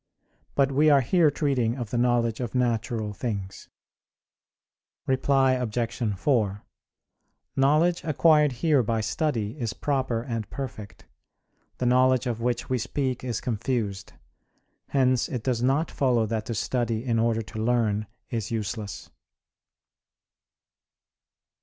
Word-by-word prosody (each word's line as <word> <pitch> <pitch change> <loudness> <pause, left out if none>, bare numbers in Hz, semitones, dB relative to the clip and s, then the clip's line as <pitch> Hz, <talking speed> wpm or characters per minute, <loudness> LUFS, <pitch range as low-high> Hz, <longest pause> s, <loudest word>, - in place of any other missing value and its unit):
But 140 -1 +3
we 150 +3 +4
are 140 -2 +6
here 160 +5 +3
treating 135 -5 0
of 120 -4 -5
the 120 - -1
knowledge 120 -2 +1
of 125 -1 -4
natural 115 -3 0
things. 100 -4 -5 1.4
Reply 135 0 +3
Obj. 120 -2 -1
4: 105 -5 0 0.9
Knowledge 155 +6 +3
acquired 155 -1 +4
here 145 +2 +2
by 115 0 -1
study 115 -4 -1
is 115 -4 -2
proper 130 -5 -1
and 115 -3 -4
perfect; 110 -8 -7 0.7
the 125 - -2
knowledge 130 +1 +4
of 115 -2 -2
which 120 0 -1
we 130 -1 0
speak 130 +1 -2
is 120 -6 -2
confused. 110 -4 -3 0.7
Hence 130 -2 +2
it 125 -4 -4
does 125 -3 0
not 135 +6 +1
follow 125 -5 +2
that 110 0 -3
to 115 - -3
study 115 +1 -1
in 115 -3 +1
order 115 0 +1
to 110 +1 -6
learn 110 -3 +1 0.2
is 115 -3 -2
useless. 110 -2 -4
120 Hz, 125 wpm, -26 LUFS, 110-135 Hz, 1.4 s, are